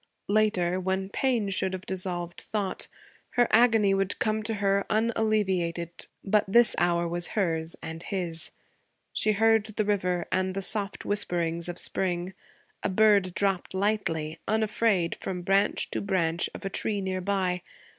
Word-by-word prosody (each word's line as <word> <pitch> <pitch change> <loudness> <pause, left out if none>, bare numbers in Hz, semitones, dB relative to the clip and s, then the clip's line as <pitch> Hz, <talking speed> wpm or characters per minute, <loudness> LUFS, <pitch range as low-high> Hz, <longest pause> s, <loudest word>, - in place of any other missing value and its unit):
Later, 200 -4 +2
when 190 +1 -1
pain 235 -2 0
should 190 0 0
have 185 0 -6
dissolved 180 -2 -4
thought, 205 -3 -3 0.5
her 245 -1 +4
agony 220 -3 +5
would 195 0 0
come 215 -1 0
to 220 +1 -3
her 200 -1 +1
unalleviated; 205 -7 0 0.3
but 210 +1 +3
this 235 +4 +5
hour 175 0 +2
was 175 +1 -1
hers, 165 -4 +1
and 165 0 -6
his. 175 -4 -1 0.6
She 215 - +2
heard 225 +1 +4
the 215 0 -2
river 180 -4 0
and 185 0 0
the 195 - -2
soft 205 0 -2
whisperings 170 -4 0
of 175 - -5
spring. 180 0 -1 0.5
A - - -1
bird 200 -2 +3
dropped 195 -2 0
lightly, 165 -6 -1
unafraid, 215 -4 +1
from 180 -2 -4
branch 195 +3 +2
to - - -2
branch 175 -4 0
of - - -8
a - - -1
tree 210 +1 0
near 190 -1 -2
by. 185 -2 0
195 Hz, 150 wpm, -27 LUFS, 175-210 Hz, 0.6 s, agony